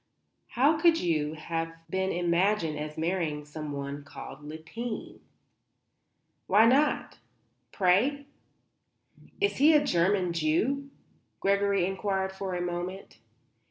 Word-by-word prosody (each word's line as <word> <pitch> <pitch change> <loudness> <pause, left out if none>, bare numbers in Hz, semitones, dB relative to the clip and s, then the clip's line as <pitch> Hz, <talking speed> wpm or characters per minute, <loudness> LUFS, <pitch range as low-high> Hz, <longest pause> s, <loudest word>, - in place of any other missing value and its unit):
"How 295 +5 +4
could 335 0 +5
you 155 -3 0
have 165 +1 -3 0.2
been 190 +2 -1
imagined 175 -2 +1
as 150 0 -6
marrying 160 -3 -1
someone 145 -2 -6
called 140 0 -10
Lippheim?" 160 +10 -7 1.3
"Why 210 +4 +6
not, 280 +5 +2 0.5
pray?" 225 +10 +2 1.1
"Is 405 0 +1
he 305 +3 +6
a 290 -1 +4
German 180 -3 +2
Jew?" 215 - 0 0.5
Gregory 200 -1 +2
inquired 190 0 -1
after 190 -1 -4
a 175 - -2
moment. 175 +2 -5
185 Hz, 105 wpm, -28 LUFS, 160-215 Hz, 1.3 s, Why